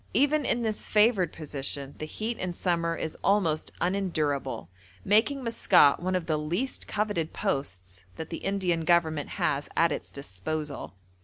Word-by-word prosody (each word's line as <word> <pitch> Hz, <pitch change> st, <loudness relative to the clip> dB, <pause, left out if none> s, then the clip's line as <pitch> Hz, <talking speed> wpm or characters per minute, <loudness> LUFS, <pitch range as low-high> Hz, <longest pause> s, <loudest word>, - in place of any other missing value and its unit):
Even 290 Hz, +2 st, +3 dB
in 240 Hz, 0 st, +1 dB
this 215 Hz, -2 st, -1 dB
favoured 210 Hz, -5 st, +4 dB
position 140 Hz, -2 st, -3 dB
the 155 Hz, -, -4 dB
heat 225 Hz, +7 st, -4 dB
in 180 Hz, -1 st, -3 dB
summer 170 Hz, -2 st, 0 dB
is 160 Hz, -1 st, -4 dB
almost 190 Hz, -6 st, +2 dB
unendurable, 155 Hz, -, -1 dB, 0.4 s
making 245 Hz, +7 st, +3 dB
Maskat 230 Hz, -, +5 dB
one 185 Hz, +1 st, -1 dB
of 180 Hz, -2 st, -1 dB
the 155 Hz, -2 st, 0 dB
least 175 Hz, +13 st, -2 dB
coveted 205 Hz, -7 st, -1 dB
posts 95 Hz, -7 st, -3 dB
that 160 Hz, +1 st, -7 dB
the 165 Hz, -, -3 dB
Indian 185 Hz, -4 st, 0 dB
Government 160 Hz, -3 st, +2 dB
has 145 Hz, 0 st, 0 dB
at 165 Hz, -1 st, +4 dB
its -, -, -4 dB
disposal. 140 Hz, +2 st, -5 dB
165 Hz, 150 wpm, -28 LUFS, 150-205 Hz, 0.4 s, Maskat